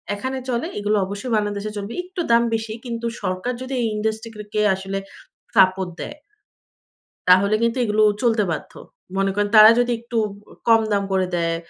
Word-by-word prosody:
এখানে 260 +5 -4
চলে। 245 +6 -1
এগুলো 210 +1 +1
অবশ্যই 200 +6 -6
বাংলাদেশে 210 0 -2
চলবে। 205 +3 -5
একটু 365 0 -5
দাম 235 0 +5
বেশি। 220 -1 -2
কিন্তু 235 -1 -4 0.2
সরকার 185 +7 -2
যদি 260 +1 -5
এই 230 - +1
ইন্ডাস্ট্রি 220 +1 -2 0.2
কে 210 - +1
আসলে 195 +1 -5 0.6
সাপোর্ট 190 -1 +4
দেয়, 290 - -6 1.1
তাহলে 200 +3 +5
কিন্তু 235 +2 +1
এগুলো 215 -1 +2 0.2
চলতে 225 -3 +3
বাধ্য। 150 - -7 0.4
মনে 195 0 +1
করেন 205 0 0
তারা 215 +1 +11
যদি 245 0 +2
একটু 235 0 -5 0.5
কম 225 -1 +6
দাম 200 -1 +1
করে 190 -1 +1
দেয়, 165 -1 0
215 Hz, 165 wpm, -22 LUFS, 200-235 Hz, 1.1 s, তারা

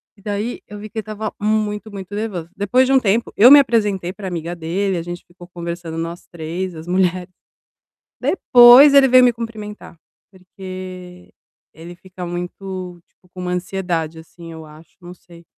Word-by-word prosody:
e 200 - -22
daí 210 +3 -4
eu 205 0 -10
vi 215 +1 -9
que 220 - -13
ele - - 0
estava 215 0 -6
muito, 210 0 -2
muito 195 0 -8
nervoso. 200 -6 -4
Depois 245 +6 +2
de 270 - +2
um 265 - +6
tempo 225 +2 0
eu 240 +5 +7
me 290 - +10
apresentei 210 -8 0
para 195 -1 -7
amiga 170 0 -5
dele, 180 +4 -2
a - - -3
gente 175 +1 -8
ficou 175 0 -15
conversando 170 -1 -6
nós 165 +1 -6
3, 170 +3 -5
as 160 +1 -10
mulheres. 180 0 0 0.9
Depois 250 -2 +7
ele 275 -1 +6
veio 255 0 +7
me 245 - +3
cumprimentar, 215 -5 -8 0.3
porque 185 -1 -11 0.4
ele 170 +2 -11
fica 185 0 -10
muito, 180 0 -7
tipo, 180 - -31
com 185 - -8
uma 180 0 -3
ansiedade, 180 -3 -3
assim, 165 +1 -13
eu 160 -1 -10
acho, 155 +2 -17
não 175 0 -11
sei. 170 -1 -18
185 Hz, 175 wpm, -19 LUFS, 175-210 Hz, 0.9 s, me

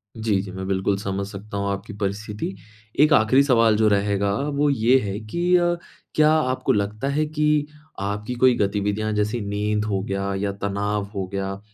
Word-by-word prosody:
जी, 110 -3 0
जी। 95 -1 -8
मैं 95 0 -6
बिल्कुल 95 +1 0
समझ 100 0 -3
सकता 100 0 -7
हूँ 100 0 -1
आपकी 100 +3 -5
परिस्थिति। 105 0 -4 0.4
एक 150 +1 +6
आख़िरी 110 +6 +5
सवाल 115 -5 +4
जो 110 0 +3
रहेगा 100 0 +1 0.2
वो 145 +1 +2
ये 125 -1 +4
है 100 -3 -4
कि 170 +12 0
अ, 175 0 +2 0.4
क्या 155 0 +5
आपको 130 -5 +1
लगता 105 +4 -1
है 150 +2 +1
कि 150 -1 +1 0.3
आपकी 105 +4 -3
कोई 125 0 +4
गतिविधियाँ 105 +1 0
जैसे 105 +3 0
नींद 105 +1 -1
हो 100 -3 -1
गया 100 -1 -2
या 100 +1 -1
तनाव 100 +1 -1
हो 95 -1 -2
गया 95 0 -4
105 Hz, 180 wpm, -23 LUFS, 100-125 Hz, 0.4 s, एक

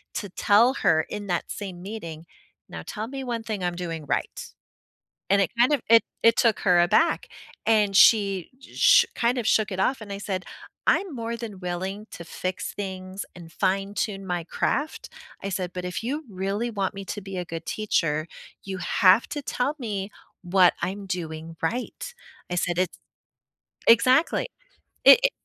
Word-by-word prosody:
to 205 - -4
tell 215 +7 +4
her 160 0 +2
in 205 -1 -6
that 175 -2 -2
same 185 -4 -6
meeting, 170 -6 -7 0.4
"Now 80 -1 -7
tell 215 +2 -5
me 270 +1 -6
1 235 -2 -3
thing 215 -5 -4
I'm 175 0 -1
doing 165 -3 -5
right," - - -3 0.8
and 200 0 +5
it 190 - +1
kind 245 +5 +5
of 285 - +2
it 230 0 +7 0.2
it 230 0 +5
took 225 -3 +3
her 180 -3 +4
aback, 315 - +2 0.4
and 210 -3 +3
she 200 -4 +5
sh - - +4
kind 240 +2 +1
of 225 - -2
shook 215 -3 +2
it 190 - -3
off 260 +6 +1
and 200 -2 -8
I 200 - -4
said, 190 -2 -4 0.4
"I'm 380 -7 +2
more 230 0 -4
than 215 -5 -8
willing 190 +4 -4
to 170 - -8
fix 185 +2 -4
things 190 -1 -5
and 165 -2 -12
fine 195 +2 0
tune 195 -2 -3
my 175 -2 -2
craft," 290 - -2 0.3
I 195 - -3
said, 180 -1 -3
"but 180 0 -4
if 180 +4 -4
you 295 +5 -3
really 200 +5 -2
want 195 -3 -2
me 195 0 -7
to 205 - -4
be 195 -1 -7
a 180 - -3
good 165 0 -7
teacher, 165 -7 0 0.4
you 190 -1 -5
have 185 +3 +4
to 290 -1 -4
tell 275 +4 -1
me 210 -5 -4 0.3
what 180 0 +5
I'm 195 +3 -3
doing 165 -2 -5
right," 245 - -3 0.4
I 180 - -1
said, 175 0 0
"it" 185 -2 +2 1.0
Exactly, 255 - +4 0.6
i - - +11
it - - +4
195 Hz, 175 wpm, -25 LUFS, 180-230 Hz, 1.0 s, i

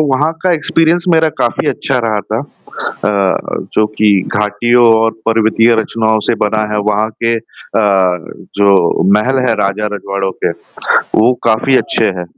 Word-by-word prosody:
वहाँ 150 +5 +1
का 185 - +2
एक्सपीरियंस 165 +1 +1
मेरा 160 -2 +3
काफ़ी 120 - 0
अच्छा 135 -2 -1
रहा 110 -2 0
था - - -4 0.7
अ, 100 -2 -1
जो 110 - +3
कि 110 0 0 0.3
घाटियों 120 +4 +2 0.2
और 115 0 +2 0.2
पर्वतीय 115 +1 +2
रचनाओं 110 -1 0
से - - +2
बना 105 +1 0
है, 105 - 0
वहाँ 105 +1 +1
के 115 0 +2
अ, 95 -5 -1 0.2
जो 100 -4 +3
महल 130 +5 0
हैं 115 - +2
राजा 100 +2 -1
रजवाड़ों 100 -1 -3
के, - - +2 0.7
वो 115 +3 +4
काफ़ी 125 +4 +2
अच्छे 115 - 0
हैं, 90 - -4
110 Hz, 150 wpm, -13 LUFS, 105-120 Hz, 0.7 s, वो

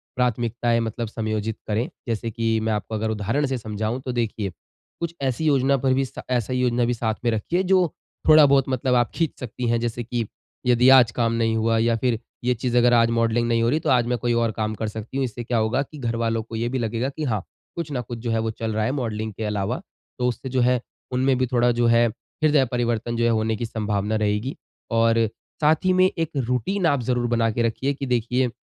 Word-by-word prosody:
प्राथमिकताएँ 120 -1 +1
मतलब 115 0 -3
समयोजित 110 -1 -3
करें, 110 +3 -1 0.2
जैसे 115 0 -2
कि 115 0 0
मैं 110 0 0
आपको 105 +2 -3
उदाहरण 110 +7 0
से 130 -1 -1
समझाऊँ 110 +2 -3
तो 125 - -2
देखिए, 110 -4 -2 0.5
कुछ 170 0 -3
ऐसी 135 +4 -1
योजना 140 -1 +3
पर 130 -1 +3
भी 135 0 +1 0.2
ऐसा 125 0 0
योजना 125 -1 +1
भी 120 - +1
साथ 110 -1 -1
में 120 - +3
रखिये 170 - 0
जो 185 -2 +5 0.4
थोड़ा-बहुत 145 -3 +7
मतलब 130 0 +1
आप 120 -1 +2
खींच 165 -3 +1
सकती 125 0 -4
हैं 115 0 +2
जैसे 120 0 -3
कि, 120 0 -2 0.4
यदि 125 +1 +5
आज 120 -4 +5
काम 115 0 0
नहीं 115 -1 +1
हुआ 115 +1 +2
या 115 +1 +2
फिर 120 -2 0 0.2
ये 125 0 +2
चीज़ 125 +1 -1
अगर 120 0 +5
आज 115 -1 +5
मॉडलिंग 115 0 +1
नहीं 115 -1 +2
हो 115 - +3
रही 155 +4 +2
तो - - -2
आज 125 -2 +4
मैं 125 0 0
कोई 120 0 0
और 115 - +1
काम 110 0 -1
कर 110 0 -3
सकती 110 +5 -6
हूँ। 135 - +1
इससे 120 0 -6
क्या 120 0 -1
होगा 110 +5 +1
कि 150 +2 -8
घर 120 -3 -2
वालों 115 -1 0
को 115 0 -9
ये 120 +2 -1
भी 130 - -2
लगेगा 115 +3 -1
कि 155 +2 -6
हाँ, 110 -8 0 0.3
कुछ 165 -3 -4
न 125 - -1
कुछ 120 -1 -6
जो 115 0 -3
है 115 - +1
वो 110 0 -1
चल 110 0 -4
रहा 110 0 0
है 130 - 0
मॉडलिंग 110 -5 -3
के 110 - -6
अलावा, 105 +3 -2 0.4
तो 125 - +1
उससे 130 +2 -3
जो 130 0 +1
है, 125 0 +3 0.3
उनमें 130 +1 +2
भी 130 -1 +1
थोड़ा 120 0 +3
जो 120 - +4
है 115 0 +5
हृदय 145 +4 0
परिवर्तन 120 -1 -1
जो 115 - 0
है 120 - +4
होने 110 0 +1
की 120 - -3
संभावना 105 -1 -1
रहेगी 105 +4 -1 0.4
और 115 0 +4 0.4
साथ 155 +4 +3
ही 185 - +4
में 185 0 +5
एक 165 -2 0
रुटीन 135 - 0
आप 140 -4 +2
ज़रूर 120 0 0
बना 115 -1 +2
के 115 +2 -1
रखिए 130 +5 0
कि 135 0 -5
देखिए 125 +1 +1
120 Hz, 235 wpm, -23 LUFS, 110-130 Hz, 0.5 s, थोड़ा-बहुत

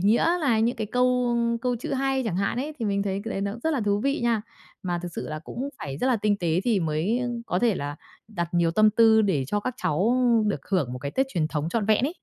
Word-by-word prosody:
nghĩa 210 - +3
này, 230 -7 +2
những 240 +2 +1
cái 220 - -3
câu 250 +1 +1 0.3
câu 250 -1 0
chữ 245 - -5
hay 270 0 0
chẳng 200 -6 -2
hạn 195 +4 0
ấy, 290 +4 -3
thì 230 - -3
mình 200 -1 0
thấy 195 0 -2
cái 225 - -4
đấy 195 - -3
nó 200 - -1
cũng 235 - -9
rất 320 - 0
là 285 - 0
thú 205 -1 +1
vị 275 +4 0
nha. 230 -3 +1 0.4
Mà 175 -2 -2
thực 175 - -4
sự - - -5
là 155 - -4
cũng 250 - -6
phải 135 -1 -5
rất 255 - 0
là 255 - +3
tinh 210 -1 +1
tế 170 -2 0
thì 225 -5 +2
mới 165 +9 0 0.3
có 180 - 0
thể 230 0 +2
là 145 -2 -4 0.3
đặt 170 -6 -3
nhiều 170 -1 +3
tâm 215 +4 +4
tư 220 0 +5
để 175 -10 +1
cho 205 +7 -1
các 255 +4 -3
cháu 195 +11 +2 0.3
được 205 - -1
hưởng 150 -10 +1
một 125 - -5
cái 140 +2 -4
Tết 265 - +1
truyền 160 -9 -1
thống 155 0 -2
trọn 215 +2 -1
vẹn 220 +3 +3
ấy. 320 - -3
210 Hz, 275 wpm, -25 LUFS, 175-240 Hz, 0.4 s, tư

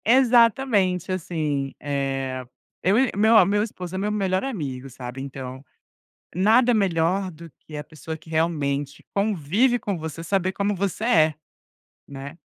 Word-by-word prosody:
Exatamente. 230 -6 +4
Assim, 155 -6 -2
eh, 135 -2 -2 0.4
eu 195 +4 +4
e 260 -1 +3
meu 220 +2 +6
meu 205 +1 +2
esposo 185 -5 -6
é - - -2
meu 205 +2 -1
melhor 190 -3 0
amigo, 140 - -4
sabe. 125 +1 -7
Então, 130 -1 -7 0.7
nada 230 +7 +4
melhor 190 -2 +1
do 165 0 -12
que 150 - -10
a 150 - -4
pessoa 160 +1 -8
que 160 +1 -17
realmente 150 -3 -1
convive 205 - +2
com 200 -5 -3
você 160 0 -6
saber 190 +1 0
como 200 +1 0
você 195 +2 -2
é, 160 -11 +4 0.7
né? 140 +2 -8
175 Hz, 145 wpm, -24 LUFS, 145-205 Hz, 0.7 s, meu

